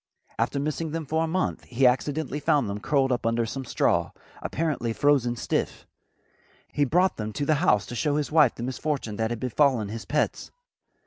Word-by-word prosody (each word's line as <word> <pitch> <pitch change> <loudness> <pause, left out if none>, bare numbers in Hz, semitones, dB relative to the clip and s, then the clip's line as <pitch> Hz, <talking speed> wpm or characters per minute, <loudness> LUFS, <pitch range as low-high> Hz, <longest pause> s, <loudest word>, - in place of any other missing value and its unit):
After 140 - 0
missing 155 +2 -3
them 165 -1 -3
for 160 +3 0
a - - -1
month 185 +3 -1
he 125 +2 +1
accidentally 145 +4 +1
found 145 -3 +2
them 100 +1 -4
curled 135 +4 +1
up 125 - 0
under 115 0 +1
some 135 +4 -5
straw, - - +1 0.3
apparently 150 -8 -2
frozen 135 -3 +2
stiff. - - -2 0.9
He 145 - +2
brought 180 +7 +2
them 110 0 -4
to 145 - -2
the 155 - +3
house 105 - +3
to - - -8
show 145 +3 0
his 150 0 -1
wife 150 -6 +5
the 120 - -6
misfortune 130 -4 -3
that 110 0 0
had 120 -1 -3
befallen 125 -3 +1
his 110 +1 -6
pets. 150 - -1
140 Hz, 190 wpm, -26 LUFS, 120-150 Hz, 0.9 s, wife